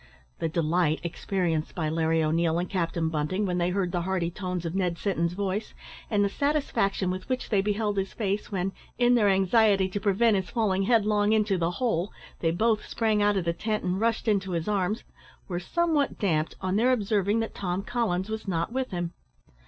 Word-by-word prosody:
The 165 - -1
delight 160 0 +1
experienced 170 -2 -2
by 160 -3 -1
Larry 160 0 +1
O'Neil 165 +1 +1
and 175 +1 -1
Captain 170 -3 -1
Bunting, 160 +6 -1
when 180 -2 -1
they 175 0 +1
heard 185 -1 -1
the 175 -1 -1
hearty 175 -1 -1
tones 180 -2 -4
of 165 - -3
Ned 180 -3 0
Sinton's 170 -4 -1
voice, 200 +2 -3 0.3
and 205 -2 +2
the - - +3
satisfaction 200 -8 0
with 185 +6 -6
which 255 -1 -2
they 200 -3 +3
beheld 205 0 -1
his 195 - -3
face, 205 -1 -2
when, 190 -1 -1 0.3
in 245 0 +4
their 215 -4 +4
anxiety 195 0 +4
to 205 - -3
prevent 205 +2 +3
his 190 -1 -3
falling 210 -5 +1
headlong 210 -1 +3
into 215 -2 +2
"the 170 -2 0
hole," 210 -6 0 0.3
they 165 - +1
both 215 +6 +1
sprang 220 -2 +1
out 205 -1 +3
of 180 - -1
the 170 - +1
tent 215 +4 -2
and 185 +2 -1
rushed 230 0 0
into 195 -3 +1
his 165 -1 -2
arms, 205 +2 0 0.4
were 175 -2 -2
somewhat 315 - 0
damped 160 -6 0
on 185 +1 0
their 245 +4 +4
observing 210 -2 +1
that 225 - -4
Tom 185 0 -2
Collins 205 -7 -1
was 220 -1 -5
not 170 +3 -1
with 260 0 -1
him. 175 -2 -3
195 Hz, 200 wpm, -27 LUFS, 175-215 Hz, 0.4 s, in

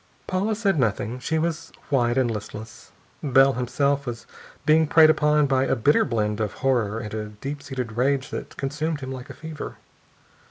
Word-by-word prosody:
Paula 200 +4 0
said 200 -7 +1
nothing. 115 +1 0
She 160 +5 -1
was 165 0 -2 0.2
white 120 -2 +2
and 125 -3 +2
listless. 110 +1 -8 0.3
Bell, 135 -1 +5
himself, 140 +3 0
was 120 -1 -5 0.4
being 155 +1 +5
preyed 155 +1 +7
upon 150 -1 +3
by 135 -1 +2
a - - +1
bitter 140 +7 +3
blend 105 -2 -1
of 105 -2 -1
horror 115 -5 +2
and 105 -1 -6
a 110 -1 -3
deep 135 +8 -6
seated 130 -5 -5
rage 130 +4 0
that - - -6
consumed 150 +2 -2
him 130 0 -5
like 130 +1 -7
a 140 - -8
fever. 155 +1 -7
135 Hz, 175 wpm, -24 LUFS, 120-150 Hz, 0.4 s, preyed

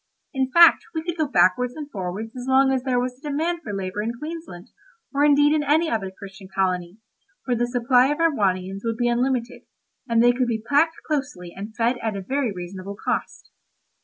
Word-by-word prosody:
In 265 -1 0
fact 340 +3 +7
we 320 - -2
could 345 0 -3
go 310 -3 0
backwards 245 +3 +2
and 300 -2 -6
forwards 200 +4 -5
as 250 0 -7
long 265 0 +4
as 260 - 0
there 250 -1 0
was 250 0 -3
a 295 - -6
demand 330 +4 -1
for 215 - -7
labour 195 0 -3
in 225 +2 -2
Queensland, 305 - -8 0.4
or 280 +1 +2
indeed 290 0 +5
in 310 - +2
any 315 +3 +2
other 205 -4 -1
Christian 195 0 -12
colony, 185 -1 -2 0.5
for 250 - 0
the 240 0 0
supply 245 +1 +3
of 295 +1 -1
Erewhonians 195 - 0
would 230 -1 -2
be 240 0 +1
unlimited, 245 0 -1 0.5
and 230 0 +4
they 245 - +6
could 250 0 0
be 225 -2 -1
packed 320 +4 +3
closely 260 - -3
and 205 +3 -8
fed 240 +1 +1
at 220 -3 -3
a - - -4
very 265 +2 -1
reasonable 185 +2 -7
cost. - - -4
245 Hz, 200 wpm, -23 LUFS, 200-285 Hz, 0.5 s, fact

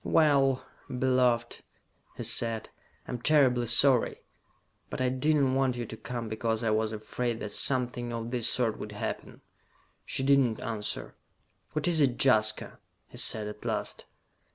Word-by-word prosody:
"Well, 140 -4 +3 0.2
beloved," 125 -2 +1 0.6
he - - -4
said. 115 -1 -2 0.4
"I - - -6
am 120 - -4
terribly 130 -5 +4
sorry. 125 +1 +4 0.7
But - - -5
I 130 0 +2
did 130 +5 +1
not 135 -3 +2
want 135 -2 +1
you 120 - -3
to 110 - -8
come 120 0 -5
because 110 +1 -2
I 115 - +1
was 110 0 +1
afraid 115 +2 -3
that 105 - -4
something 125 -1 -1
of 115 0 -4
this 120 -3 +1
sort 115 -3 +1
would 105 - -7
happen." 105 - -5 0.6
She 135 - -2
did 140 +1 +5
not 120 -5 +1
answer. 110 -3 -4 0.6
"What 155 +2 0
is 165 -3 +3
it, 130 -4 +2
Jaska?" 110 -5 +2 0.3
he - - -12
said 110 -2 0
at 105 0 -9
last. - - -3
120 Hz, 160 wpm, -29 LUFS, 110-130 Hz, 0.7 s, did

